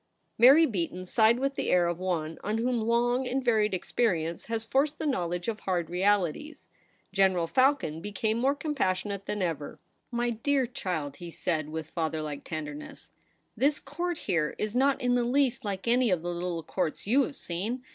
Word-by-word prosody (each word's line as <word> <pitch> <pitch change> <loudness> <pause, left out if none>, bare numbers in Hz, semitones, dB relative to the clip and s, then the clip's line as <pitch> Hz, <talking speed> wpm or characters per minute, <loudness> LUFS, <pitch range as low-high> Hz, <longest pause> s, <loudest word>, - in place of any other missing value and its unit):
Mary 275 +7 +8
Beaton 185 - -3
sighed 220 +4 +4
with 275 +2 0
the - - -2
air 180 -1 +4
of 170 0 -1
one 165 -4 -2
on 210 +2 -1
whom 240 0 0
long 240 +3 +1
and 260 +1 -1
varied 215 -3 +3
experience 175 -4 -1
has 225 -1 -2
forced 285 +5 +1
the - - -4
knowledge 175 - -1
of 220 -2 -2
hard 175 -5 -2
realities. 200 - 0 0.5
General 190 -3 +3
Falcon 255 - +2
became 215 +3 -1
more 270 +3 +2
compassionate 200 - -2
than 210 -2 -1
ever. 160 -5 -3 0.2
' - - -47
My 240 0 0
dear 265 +4 +1
child,' 160 - -4
he 175 - -8
said, 160 -2 -2
with 160 0 -6
father 160 -2 -2
like 150 -2 -5
tenderness, 150 -3 -7 0.4
'this 285 +3 +2
Court 340 +5 -3
here 165 - -1
is 215 0 -2
not 270 +2 +3
in 245 0 +1
the 245 -1 +2
least 260 +1 +1
like 200 0 -4
any 245 0 +3
of 180 -3 +1
the 175 0 -2
little 175 -1 -3
Courts 160 0 -2
you 250 +8 +4
have 280 +1 -2
seen. 220 +6 -4
210 Hz, 185 wpm, -28 LUFS, 175-250 Hz, 0.5 s, Mary